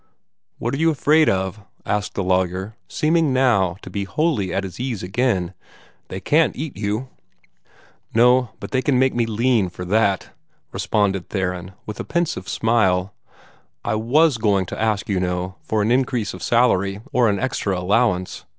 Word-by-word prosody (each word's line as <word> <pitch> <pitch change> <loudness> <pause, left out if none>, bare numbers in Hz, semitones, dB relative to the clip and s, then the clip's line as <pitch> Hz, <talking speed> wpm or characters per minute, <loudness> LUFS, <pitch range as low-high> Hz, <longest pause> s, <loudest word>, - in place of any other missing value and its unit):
"What 120 +3 -3
are - - -1
you 165 +1 +4
afraid 155 +1 +3
of?" 95 +2 -1 0.3
asked 105 -2 -2
the 100 - -1
lawyer, 95 +3 0
seeming 155 - +1
now 115 -9 +2
to - - -8
be 100 -1 -3
wholly 130 - 0
at 100 - -1
his 95 0 -8
ease 120 -6 -3
again 95 -2 0 0.5
"They 95 - -6
can't 155 - +2
eat 150 +1 -5
you." 105 +6 -3 1.0
"No, 125 +1 +4
they 130 - -1
keep 135 0 +1
me 125 -2 +2
too - - -5
lean 115 -3 +2
for 90 +1 -8
that," 100 0 +1 0.4
responded 100 -3 0
Theron, 90 -1 -3
with 105 - -7
a - - -2
pensive 170 -1 -2
smile. 100 -4 +1 0.7
"I - - 0
WAS 125 +5 +3
going 100 -4 +2
to 90 - -6
ask, 110 -2 0
you 100 -3 0
know, 90 +1 -2
for 110 -1 -1
an 110 - +1
increase 125 -4 0
of - - -9
salary, 100 -5 +2
or 120 -3 +4
an 100 - +1
extra 105 -7 -1
allowance. 90 0 0
105 Hz, 165 wpm, -21 LUFS, 95-125 Hz, 1.0 s, you